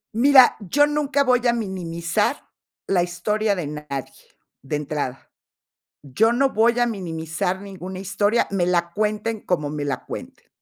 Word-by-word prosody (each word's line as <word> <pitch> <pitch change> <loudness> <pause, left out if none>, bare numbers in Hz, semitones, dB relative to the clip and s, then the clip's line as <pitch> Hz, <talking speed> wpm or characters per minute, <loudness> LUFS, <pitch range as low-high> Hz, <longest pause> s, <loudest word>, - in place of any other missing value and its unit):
Mira, 260 +2 +6
yo 245 +9 +3
nunca 290 -1 +1
voy 250 -2 +2
a 235 - +4
minimizar 190 +2 -2 0.4
la 185 -2 +2
historia 200 +4 0
de 175 -4 -3
nadie, 145 -3 -6 0.5
de 135 +3 -4
entrada. 145 -3 -4 0.7
Yo 150 - +2
no 265 +3 +2
voy 235 +3 +3
a 240 - +4
minimizar 170 -3 -3
ninguna 190 -1 -8
historia, 205 +4 +1
me 190 -3 +1
la 170 -1 0
cuenten 215 +1 -1
como 150 -5 -1
me 150 0 -4
la 145 -1 -3
cuenten. - - -9
195 Hz, 145 wpm, -22 LUFS, 165-230 Hz, 0.7 s, Mira